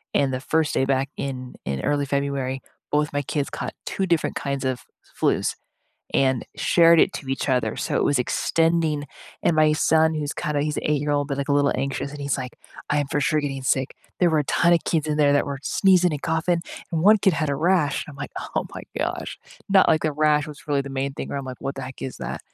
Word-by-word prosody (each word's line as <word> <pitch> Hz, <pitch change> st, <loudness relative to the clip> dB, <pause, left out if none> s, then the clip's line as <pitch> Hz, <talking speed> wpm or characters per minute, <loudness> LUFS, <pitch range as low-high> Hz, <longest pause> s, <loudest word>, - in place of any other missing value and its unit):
And, 140 Hz, -2 st, +3 dB
the 130 Hz, -, -1 dB
1st 155 Hz, +2 st, +1 dB
day 130 Hz, -, +2 dB
back, 135 Hz, 0 st, 0 dB
in 130 Hz, -2 st, -5 dB
in 70 Hz, -1 st, -2 dB
early 145 Hz, -1 st, 0 dB
February, 140 Hz, -1 st, -2 dB, 0.3 s
both 150 Hz, 0 st, +1 dB
my 145 Hz, 0 st, 0 dB
kids 145 Hz, +1 st, -2 dB
caught -, -, -5 dB
2 195 Hz, -, -1 dB
different 170 Hz, -3 st, +1 dB
kinds 140 Hz, -1 st, -3 dB
of 130 Hz, -1 st, -1 dB, 0.4 s
flus -, -, +1 dB, 0.6 s
and 130 Hz, -2 st, +2 dB
shared 170 Hz, -1 st, +5 dB
it -, -, +3 dB
to 135 Hz, -, -7 dB
each 135 Hz, +2 st, -2 dB
other, 125 Hz, -4 st, +1 dB
so -, -, -1 dB
it -, -, +2 dB
was 145 Hz, -3 st, +2 dB
extending 160 Hz, +3 st, +1 dB, 0.4 s
and 160 Hz, -, +2 dB
my 155 Hz, 0 st, +5 dB
son, 160 Hz, +1 st, +3 dB
who's 150 Hz, -2 st, -2 dB
kinda 150 Hz, -1 st, -1 dB
he's 150 Hz, 0 st, -2 dB
a -, -, -1 dB
8 150 Hz, -, +2 dB
year-old, 145 Hz, -1 st, 0 dB
but, 140 Hz, -, -3 dB
like, 140 Hz, -, -3 dB
a 145 Hz, -, +2 dB
little 145 Hz, 0 st, +3 dB
anxious, 140 Hz, +1 st, -3 dB
and 145 Hz, -, -8 dB
he's 140 Hz, -1 st, -1 dB
like, 125 Hz, -2 st, -6 dB, 0.3 s
"I'm 145 Hz, -1 st, +1 dB
for 145 Hz, -, 0 dB
sure 155 Hz, +1 st, +2 dB
getting 135 Hz, -2 st, -4 dB
sick. 130 Hz, +1 st, 0 dB, 0.3 s
There 180 Hz, -, +5 dB
were 155 Hz, -, +2 dB
a -, -, -1 dB
ton 170 Hz, +5 st, +3 dB
of 170 Hz, -, 0 dB
kids 155 Hz, -2 st, 0 dB
in 150 Hz, -, 0 dB
there 145 Hz, -1 st, +5 dB
that 145 Hz, -, +2 dB
were 140 Hz, -1 st, -4 dB
sneezing 180 Hz, 0 st, +3 dB
and 145 Hz, -, -3 dB
coughing, 165 Hz, +1 st, +1 dB, 0.3 s
and 165 Hz, -, 0 dB
1 215 Hz, +3 st, +7 dB
kid 190 Hz, -4 st, +3 dB
had 155 Hz, -2 st, -1 dB
a -, -, 0 dB
rash," 165 Hz, -3 st, +1 dB
and 150 Hz, -, -10 dB
I'm -, -, -13 dB
like, 140 Hz, -, -6 dB, 0.2 s
"Oh -, -, 0 dB
my -, -, -7 dB, 0.2 s
gosh." -, -, -3 dB, 0.3 s
Not 195 Hz, -1 st, +6 dB
like 155 Hz, -, +3 dB
the 155 Hz, -1 st, 0 dB
rash 150 Hz, +1 st, +2 dB
was 150 Hz, -1 st, -11 dB
really 140 Hz, -1 st, +1 dB
the 140 Hz, -, -8 dB
main 140 Hz, 0 st, -2 dB
thing, -, -, -5 dB
where 140 Hz, -, -3 dB
I'm 140 Hz, -, -5 dB
like, 130 Hz, -1 st, -7 dB
"What 135 Hz, -, -3 dB
the 135 Hz, -, -5 dB
heck 130 Hz, 0 st, -8 dB
is 130 Hz, -, -5 dB
that?" -, -, -5 dB
145 Hz, 245 wpm, -24 LUFS, 135-155 Hz, 0.6 s, 1